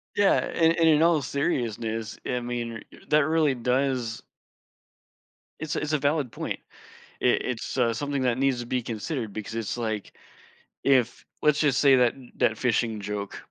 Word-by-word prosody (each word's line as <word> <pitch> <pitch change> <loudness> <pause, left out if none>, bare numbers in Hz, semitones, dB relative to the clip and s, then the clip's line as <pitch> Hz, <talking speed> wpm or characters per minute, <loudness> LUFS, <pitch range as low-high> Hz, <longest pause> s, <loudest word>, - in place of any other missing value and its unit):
Yeah, 205 -1 +4
and 165 0 +2
and 165 -1 +5
in 155 0 +5
all 165 -3 +4
seriousness, 115 -5 -2
I 125 -1 -1
mean, 120 -2 -4 0.3
that 150 -1 +4
really 155 -3 +2
does 125 -1 0 1.4
It's 155 -1 -3
a - - -1
it's 150 0 -2
a - - +4
valid 145 -3 0
point. - - -4 0.6
I - - -1
it's, 125 0 0
uh, 115 -2 +2
something 140 +3 -2
that 125 -1 +1
needs 135 -2 +1
to 120 - -5
be 125 +1 -1
considered 115 0 -4
because 110 +2 -6
it's 115 +1 -3
like, 110 -3 -4 0.7
if 130 -4 +2 0.2
let's 150 -1 +3
just 145 -4 +2
say 140 -2 +6
that 125 -2 +4 0.2
that 110 - +2
fishing 115 -3 0
joke, 100 0 -4
125 Hz, 165 wpm, -26 LUFS, 115-145 Hz, 1.4 s, say